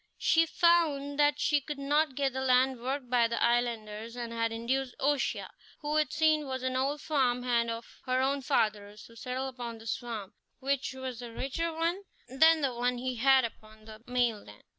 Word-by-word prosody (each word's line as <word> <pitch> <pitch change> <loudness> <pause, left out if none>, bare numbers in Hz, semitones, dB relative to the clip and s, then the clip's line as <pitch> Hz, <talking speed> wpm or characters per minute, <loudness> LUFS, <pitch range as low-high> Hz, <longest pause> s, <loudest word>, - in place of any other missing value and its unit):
She 330 0 +3
found 305 -5 +2
that 290 0 +3
she 295 -1 +2
could 295 +1 -6
not 290 0 +1
get 275 -1 0
the 265 - -3
land 255 -1 +3
worked 260 +1 -3
by 240 -1 +3
the 230 0 -2
islanders, 230 -2 -1
and 235 -1 -5
had 230 0 0
induced 245 +3 -2
O'Shea, 285 0 0 0.4
who 300 0 -2
it 305 -3 +1
seemed 310 -1 +2
was 260 -1 -4
an 260 0 -1
old 275 +3 0
farm 255 -5 +1
hand 235 -2 +1
of 230 0 -7
her 255 0 +2
own 275 +1 +1
father's, 210 -6 -1
to 230 - -15
settle 255 +3 -4
upon 240 -3 -6
this 225 0 -3
farm, 225 -6 -7 0.3
which 275 0 -1
was 260 -2 -6
a 240 -1 -7
richer 275 +8 -2
one 335 +4 -1 0.3
than 315 +5 +5
the 270 -3 0
one 245 +1 0
he 255 0 -3
had 265 +2 +5
had 230 - -2
upon 215 0 -19
the 215 0 -12
mainland. 235 - -1
255 Hz, 195 wpm, -30 LUFS, 235-280 Hz, 0.4 s, than